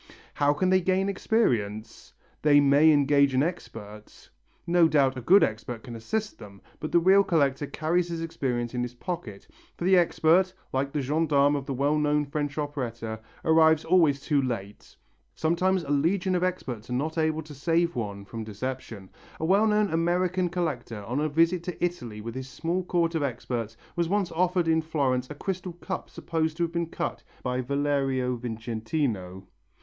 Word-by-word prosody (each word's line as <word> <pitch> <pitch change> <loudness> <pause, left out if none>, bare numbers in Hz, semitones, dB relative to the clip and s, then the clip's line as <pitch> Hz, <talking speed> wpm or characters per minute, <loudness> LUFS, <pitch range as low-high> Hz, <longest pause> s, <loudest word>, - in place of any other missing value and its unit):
How 145 0 +2
can 185 +5 +1
they 185 0 +4
gain 190 +2 +1
experience? 115 - -1 0.3
They 145 -1 +6
may 145 +2 +5
engage 140 -2 +3
an 130 - +3
expert. 105 - -7 0.3
No 170 -1 +4
doubt 140 -4 +2
a 130 - -5
good 190 - +6
expert 110 +1 -3
can 120 - -8
assist 210 - -3
them, 100 -1 -12 0.2
but 155 - -5
the - - +4
real 190 +3 +5
collector 145 -5 +1
carries 170 +4 0
his 170 -1 -3
experience 130 -8 -3
in 125 - -1
his 120 0 -4
pocket, 125 - -6 0.3
for 175 - -4
the 190 +1 +5
expert, 175 +2 +3 0.2
like 135 +1 -1
the 145 -1 -2
gendarmes 145 0 +2
of 140 -1 -4
the 135 - -2
well 145 +3 +1
known 150 0 +1
French 145 0 -3
operetta, 120 -7 -4 0.3
arrives 160 -1 +4
always 160 -5 +4
too 145 0 +1
late. 105 -6 -5 0.4
Sometimes 180 +3 +1
a 140 - -5
legion 180 +6 +1
of 180 0 +1
experts 130 -11 -3
are - - -3
not 155 +6 -1
able 160 0 0
to 150 0 -11
save 165 +4 0
one 100 -4 -4
from 115 +2 -6
deception. 110 -2 -6 0.3
A 160 - -1
well 200 +5 +4
known 210 -1 +2
American 175 +2 +1
collector 140 - -3
on 120 +7 -2
a 155 +1 0
visit 165 +4 +2
to 180 -1 -2
Italy 120 -12 -5
with 115 +1 -6
his 130 +1 -6
small 170 +6 -2
court 170 -2 +1
of 160 - -1
experts 120 -4 -3 0.2
was 170 -2 0
once 200 -2 0
offered 180 0 +1
in 160 0 +3
Florence 135 -5 -1
a 150 - -7
crystal 185 +2 -4
cup 185 +2 -6
supposed 160 -1 -2
to 170 - 0
have 165 - -1
been 170 -1 -1
cut - - -4 0.2
by 125 0 -1
Valerio 135 -1 0
Vicentino. 110 - -3
150 Hz, 180 wpm, -27 LUFS, 125-170 Hz, 0.4 s, They